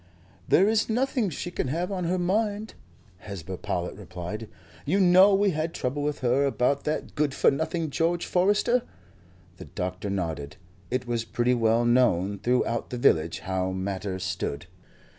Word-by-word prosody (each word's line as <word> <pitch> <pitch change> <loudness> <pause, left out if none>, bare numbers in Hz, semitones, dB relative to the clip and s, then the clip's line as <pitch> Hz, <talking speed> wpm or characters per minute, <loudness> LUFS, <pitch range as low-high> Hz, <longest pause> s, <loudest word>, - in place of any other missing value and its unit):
"There 195 - +5
is 220 +1 +2
nothing 245 -2 +1
she 175 +2 -5
can 175 - -2
have 170 +8 -2
on 185 -3 -2
her 180 +2 0
mind," 205 +4 -1 0.5
Hesba 95 0 -7
Powlett 90 0 -3
replied. 95 +3 -7 0.3
"You 190 +7 +1
know 190 +2 +6
we 200 0 +3
had 160 +1 -3
trouble 135 +3 -2
with 145 -1 -2
her 130 +2 +2
about 140 +1 +1
that 155 +1 -2
good 145 -2 0
for - - +4
nothing 160 +2 -2
George 170 +3 0
Forester?" 205 +7 +2 0.8
The - - -9
doctor 90 +1 -4
nodded. 80 -4 -3 0.3
It 125 0 -1
was 120 -1 -1
pretty 120 +2 0
well 115 0 +2
known 100 -6 +2
throughout 120 +1 0
the 125 - -4
village 80 -8 +2
how 95 0 -2
matters 95 0 -3
stood. 85 -4 -3
125 Hz, 160 wpm, -26 LUFS, -, 0.8 s, know